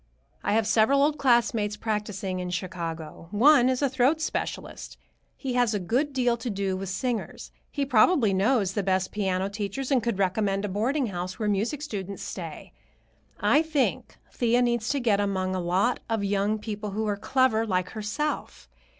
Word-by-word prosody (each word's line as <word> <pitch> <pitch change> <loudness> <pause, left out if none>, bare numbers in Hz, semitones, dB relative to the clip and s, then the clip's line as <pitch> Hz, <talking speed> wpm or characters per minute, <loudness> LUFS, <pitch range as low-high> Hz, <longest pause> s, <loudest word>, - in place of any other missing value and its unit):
I - - +1
have 220 0 +2
several 225 +6 +4
old 300 +1 +1
classmates 230 -5 +2
practicing 210 -4 -3
in 180 0 -4
Chicago. 170 -3 -5
One 250 +4 +5
is 260 +2 0
a - - +4
throat 265 +4 +2
specialist. 315 - -4 0.4
He 265 -3 -3
has 245 -3 +2
a - - 0
good 250 - 0
deal 245 -3 +1
to 235 +1 -4
do 195 -2 -1
with 190 0 -5
singers. 230 +4 -3 0.2
He 285 -2 -2
probably 245 - +4
knows 200 0 +2
the 205 - 0
best 190 -1 0
piano 190 -2 -1
teachers 210 +7 -4
and 260 -3 +4
could 235 -4 -1
recommend 195 +1 0
a - - -3
boarding 250 +9 0
house 180 +1 -4
where 215 - -2
music 220 +9 -1
students 200 - -5
stay. - - -7 0.7
I 295 - +4
think 315 -4 -1 0.2
Thea 240 0 +2
needs 240 -1 0
to 285 - +1
get 220 -5 +2
among 190 -2 -1
a 185 - -1
lot 185 +8 +1
of 225 -2 0
young 200 +2 +1
people 210 -1 -5
who 220 +2 -1
are 205 -1 0
clever 225 +1 +1
like 185 -2 -1
herself. 220 +8 -4
215 Hz, 175 wpm, -26 LUFS, 195-250 Hz, 0.7 s, One